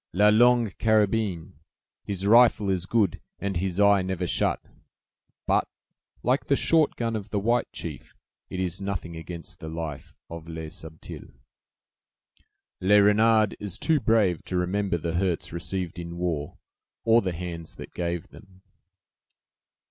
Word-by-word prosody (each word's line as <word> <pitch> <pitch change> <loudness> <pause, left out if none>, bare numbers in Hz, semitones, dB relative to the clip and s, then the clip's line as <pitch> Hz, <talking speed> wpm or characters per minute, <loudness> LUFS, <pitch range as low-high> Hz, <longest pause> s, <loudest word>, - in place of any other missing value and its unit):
"'La 105 +4 +5
Longue 120 0 +4
Carabine'! 105 -8 +1 0.5
His 100 -1 -3
rifle 110 -2 +5
is 95 -1 -1
good, 105 -7 +1 0.2
and 100 -2 -3
his 95 +1 -2
eye 100 -1 +5
never 95 -1 -2
shut; - - +1 0.9
but, - - +2 0.6
like 130 +3 +1
the 140 - +3
short 160 +1 +2
gun 115 -1 -2
of 105 -1 -5
the 105 - -2
white 115 +4 +1
chief, - - -7 0.3
it 95 - -5
is 95 +1 -2
nothing 95 -4 -4
against 85 +1 -8
the 80 -2 -7
life 80 -3 -6
of 85 -1 -9
Le 80 -1 -6
Subtil." 80 -1 -9 1.5
"Le 100 +3 +5
Renard 110 +1 +4
is 100 -1 -5
too 160 +2 +2
brave 110 - +2
to 90 - -3
remember 95 +1 0
the 85 0 -3
hurts 90 -2 -1
received 90 +1 -4
in 85 0 -7
war, 80 -5 -3 0.5
or 115 +1 +5
the 95 -3 -2
hands 85 -1 -6
that - - -10
gave 85 +1 -3
them." 95 -2 -17
95 Hz, 145 wpm, -26 LUFS, 85-110 Hz, 1.5 s, La